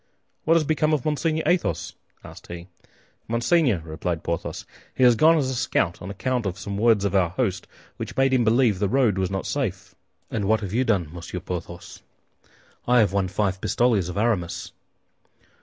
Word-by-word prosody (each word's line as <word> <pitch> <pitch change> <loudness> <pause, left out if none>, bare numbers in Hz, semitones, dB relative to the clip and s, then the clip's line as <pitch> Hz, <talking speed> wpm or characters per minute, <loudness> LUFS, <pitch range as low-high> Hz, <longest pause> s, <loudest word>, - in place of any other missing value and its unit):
"What 165 - +4
has 165 - +3
become 155 0 +1
of 145 -5 0
Monseigneur 155 +1 0
Athos?" 175 +2 0 0.3
asked - - -12
he. 85 0 -8 0.6
"Monseigneur," 115 - +2
replied 80 +1 -4
Porthos, 85 -1 -4 0.3
"he 130 - +1
has 120 -2 +7
gone 160 +7 +5
as 140 -4 +1
a - - -2
scout, 90 -7 -1
on 90 - -7
account 120 +3 -2
of 95 0 -4
some 100 -1 -5
words 110 -1 +3
of 100 - -1
our 95 -3 +3
host, 95 -2 -2 0.3
which - - -7
made 135 0 +3
him 125 -2 +3
believe 115 -3 +3
the 100 -1 +1
road 115 -6 +2
was 95 -1 0
not 95 -1 -3
safe." 110 -11 -3 0.4
"And 105 -3 -2
you, - - -1
what 110 +1 +2
have 100 -2 -5
you 125 +3 +2
done, 100 -10 0
Monsieur 90 +1 -6
Porthos?" 85 -1 -7 0.9
"I 125 0 +4
have 105 -5 +3
won 100 -2 +1
five 95 0 -1
pistoles 110 -8 +1
of 90 - -6
Aramis." 90 -6 -1
105 Hz, 190 wpm, -24 LUFS, 90-130 Hz, 0.9 s, has